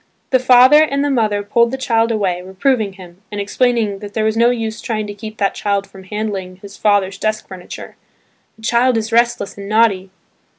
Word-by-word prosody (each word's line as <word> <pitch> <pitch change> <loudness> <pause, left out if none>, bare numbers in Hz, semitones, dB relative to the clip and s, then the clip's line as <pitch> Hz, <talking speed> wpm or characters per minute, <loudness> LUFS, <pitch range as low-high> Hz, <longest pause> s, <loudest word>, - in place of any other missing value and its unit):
The 260 - +4
father 255 +4 +6
and 280 -2 +1
the 290 - 0
mother 215 -5 0
pulled 235 +3 +2
the 265 - -4
child 230 -3 +1
away, 190 -5 -1
reproving 200 +3 -1
him, 185 -1 -14
and 205 - -4
explaining 215 -1 0
that 205 0 -10
there 220 - 0
was 220 0 +1
no 235 +1 +4
use 225 -2 -3
trying 215 -2 -3
to 205 - -6
keep 215 +1 -9
that 200 -1 0
child 200 -1 -1
from 190 -1 -15
handling 200 -3 -4
his 200 +2 -13
father's 200 -2 +1
desk 215 0 -2
furniture, 185 -2 -10 0.6
"The 220 - -20
child 240 +2 +2
is 225 +1 -3
restless 235 -3 +1
and 200 0 -7
naughty." 210 -4 +2
215 Hz, 200 wpm, -17 LUFS, 200-235 Hz, 0.6 s, father